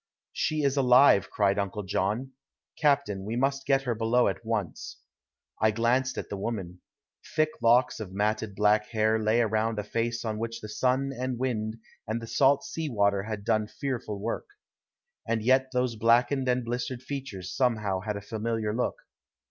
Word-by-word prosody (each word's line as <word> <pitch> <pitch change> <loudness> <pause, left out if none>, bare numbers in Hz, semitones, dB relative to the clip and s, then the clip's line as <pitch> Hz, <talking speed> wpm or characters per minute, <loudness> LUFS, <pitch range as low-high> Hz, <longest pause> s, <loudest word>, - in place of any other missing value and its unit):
"She 155 -1 0
is 140 0 +1
alive," 125 -5 +6
cried 100 -1 +1
Uncle 100 +1 -3
John. 105 +7 -1 0.4
"Captain, 125 -10 +1
we 110 +3 -4
must 135 +2 0
get 135 -1 +3
her 125 -3 0
below 115 +2 +2
at - - -5
once." 110 -6 -3 0.6
I 110 - +5
glanced 120 +4 +1
at - - -4
the 100 - -5
woman. 95 -4 -4 0.5
Thick 155 0 +3
locks 120 +2 +4
of 105 -4 -6
matted 105 +1 -1
black 105 +1 +3
hair 110 0 +1
lay 110 +2 +3
around 110 0 0
a 105 - -1
face 115 +2 -2
on 110 -1 -2
which 115 0 -4
the 110 - -8
sun 130 +4 0
and 125 0 -3
wind 115 -3 -2 0.3
and 110 +2 -1
the 115 - -7
salt 135 +4 +3
sea 160 -2 -4
water 100 -4 +2
had 105 0 -5
done 110 -1 +1
fearful 120 -5 -4
work. 115 +3 -3 0.8
And 115 -2 0
yet 130 +2 +3
those 125 -2 0
blackened 120 +4 +3
and 125 -1 +1
blistered 125 +1 -3
features 105 -11 -6
somehow 110 -7 +1
had 105 +1 -3
a - - -7
familiar 110 0 -2
look. 125 - 0
115 Hz, 170 wpm, -28 LUFS, 105-125 Hz, 0.8 s, alive